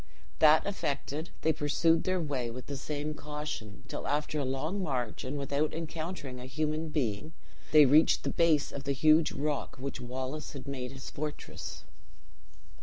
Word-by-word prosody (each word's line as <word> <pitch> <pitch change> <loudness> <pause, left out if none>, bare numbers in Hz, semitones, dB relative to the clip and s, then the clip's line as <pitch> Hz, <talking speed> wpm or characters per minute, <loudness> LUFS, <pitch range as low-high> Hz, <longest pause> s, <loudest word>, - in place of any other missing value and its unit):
That 155 0 +7
effected, 155 -4 -2
they 160 - +3
pursued 160 +3 +2
their 185 0 +2
way 140 -7 -1
with 125 +2 -7
the 140 - -5
same 150 +2 -3
caution, 150 -8 -6
till - - -5
after 150 +1 0
a - - 0
long 150 +9 -1
march, 125 -9 -2
and 130 +3 -3
without 140 +2 0
encountering 160 -4 -5
a 125 - -7
human 155 +3 -1
being, 135 0 -1 0.4
they 150 -1 +9
reached 150 +5 +5
the - - 0
base 160 -3 +3
of 140 0 -6
the 140 - +1
huge 155 +3 +5
rock 145 0 -2
which 135 +1 -5
Wallace 130 +4 -4
had 140 -1 -8
made 130 -2 -4
his 135 -1 -8
fortress. 150 0 -5
145 Hz, 165 wpm, -31 LUFS, 135-155 Hz, 0.4 s, they